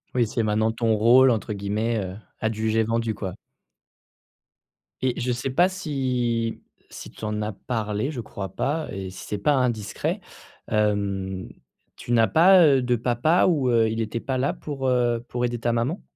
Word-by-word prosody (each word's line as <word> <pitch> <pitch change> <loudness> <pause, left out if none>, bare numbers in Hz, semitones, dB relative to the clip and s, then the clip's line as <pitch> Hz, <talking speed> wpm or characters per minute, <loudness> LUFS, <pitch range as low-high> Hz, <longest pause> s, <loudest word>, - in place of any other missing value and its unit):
Oui, 120 -2 +3
c'est 115 +1 -1
maintenant 110 +1 +1
ton 115 -1 +1
«rôle» 125 +4 +6
entre 110 -1 -2
guillemets, 105 +3 -1
heu, 95 +1 -6 0.2
adjugé 110 0 +1
vendu, 115 0 -1
quoi. 95 -3 -5 1.7
Et 130 -2 0
je 125 0 -1
sais 125 +2 -2
pas 175 +8 +4
si 125 -10 -2 0.3
si - - -9
tu - - -15
en 105 0 -2
as 105 0 -3
parlé- 110 +3 -3
je 135 - -6
crois 100 -3 -6
pas- 155 +3 -1
et 95 -1 -5
si 95 - -10
c'est 105 - -3
pas 145 +9 +2
indiscret, 120 -6 -1 0.5
hem, 100 -3 -1 0.5
tu - - -7
n'as 115 -2 +4
pas, 180 +3 +6
heu, 135 -3 +4
de 125 0 +1
papa 120 +8 +2
ou, 145 -8 +2
heu, 115 -2 +3
il 110 +1 -2
était 110 +1 -3
pas 130 +2 -2
là 135 +2 0
pour, 135 -3 -4
heu, 120 -2 +1
pour 125 0 -1
aider 120 0 -3
ta 120 +1 0
maman? 125 - -1
115 Hz, 180 wpm, -24 LUFS, 110-130 Hz, 1.7 s, rôle